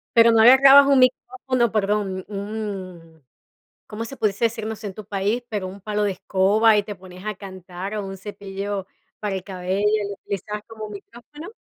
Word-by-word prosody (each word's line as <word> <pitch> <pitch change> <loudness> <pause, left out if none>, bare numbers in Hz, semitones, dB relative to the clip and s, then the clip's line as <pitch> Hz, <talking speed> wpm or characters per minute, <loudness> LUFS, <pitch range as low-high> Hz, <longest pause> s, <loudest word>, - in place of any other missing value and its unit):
Pero, 230 0 +7
no 225 -1 +5
agarrabas 270 +3 +8
un 275 -1 +4
micrófono, 255 -1 +1
perdón, 200 -3 -1
un, 195 -6 -7 0.6
¿cómo 220 +2 -5
se 270 +3 -9
pudiese 210 +1 +1
decirnos 220 -1 -3
en 200 -2 -5
tu 215 - -9
país? 205 +4 -1
Pero, 205 -4 -3
¿un 195 +1 -10
palo 210 0 -1
de 205 - +1
escoba, 205 +4 +3
y 205 - +2
te 205 0 -6
ponías 185 0 -13
a 215 - -2
cantar, 190 0 -8
o, 205 - -3
un 195 0 -7
cepillo 200 0 -5 0.3
para 210 -2 -3
el 185 - -5
cabello, 190 0 -3
y 210 -1 +1
lo - - -4
utilizabas 205 +1 -5
como 220 -1 -8
micrófono? 240 - -11
205 Hz, 180 wpm, -23 LUFS, 195-225 Hz, 0.6 s, agarrabas